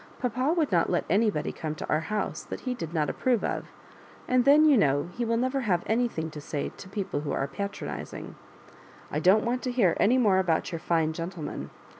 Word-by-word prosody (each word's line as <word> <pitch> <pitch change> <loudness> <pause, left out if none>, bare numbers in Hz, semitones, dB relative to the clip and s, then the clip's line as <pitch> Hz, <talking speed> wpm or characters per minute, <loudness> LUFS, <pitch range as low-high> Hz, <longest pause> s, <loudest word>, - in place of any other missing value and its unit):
" - - -23
Papa 255 +3 0
would 310 -7 +1
not 170 -2 +3
let - - 0
any 215 +4 +4
body 150 -7 -2
come 155 -1 -5
to - - -6
our 155 - +2
house 210 +7 -3
that - - -7
he 255 - -2
did 165 -10 -6
not 155 -3 0
approve 245 - 0
of; - - -2 0.6
and 250 -1 +3
then, 295 +3 +7
you 300 -2 +6
know, 145 - +2
he 245 - -2
will 230 0 +1
never 255 +3 0
have 185 -8 +1
any 240 +3 +2
thing 160 -8 -5
to 150 - -8
say 145 0 -3
to 190 - -10
people 195 -6 -3
who 150 - -3
are 135 - -1
patronising. 200 +9 -6 0.8
I - - 0
don't 195 +5 +4
want 245 +2 0
to 255 - -2
hear 220 -9 +3
any 240 +5 +4
more 205 -7 +4
about 175 -3 0
your 165 - -3
fine 160 -1 +1
gen 165 +2 -4
tleman. 170 -5 -6
200 Hz, 230 wpm, -27 LUFS, 160-245 Hz, 0.8 s, then